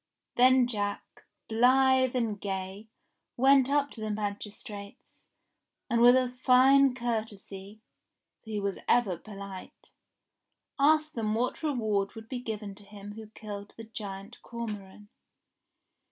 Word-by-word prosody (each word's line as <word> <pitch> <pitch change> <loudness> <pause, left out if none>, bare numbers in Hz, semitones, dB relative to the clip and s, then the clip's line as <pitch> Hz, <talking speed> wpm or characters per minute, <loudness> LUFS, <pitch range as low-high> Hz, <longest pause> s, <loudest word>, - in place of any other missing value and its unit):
Then 255 +1 +6
Jack, 205 -4 -4 0.2
blithe 260 +2 +4
and 225 -5 -1
gay, 195 +1 -5 0.5
went 270 +1 +5
up 285 0 +1
to 225 - -10
the 215 - -3
magistrates, 205 -1 -7 0.6
and 235 0 +3
with 245 +1 +8
a 255 -1 +3
fine 255 +2 +4
courtesy 215 -4 -5 0.3
— - - -58
for 220 - -13
he 210 -1 -2
was 200 -1 -3
ever 235 -7 +3
polite 200 0 -10 0.5
— - - -55
asked 310 +2 +3
them 215 -2 -1
what 245 +7 -1
re 305 -2 0
ward 210 -5 -1
would 225 0 -10
be 255 - -4
given 215 -4 -5
to 205 +1 -16
him 205 0 -10
who 220 0 -10
killed 205 -1 -9
the 225 - -8
giant 205 -1 -8
Cormoran? 210 -3 -7
220 Hz, 140 wpm, -29 LUFS, 205-250 Hz, 0.6 s, with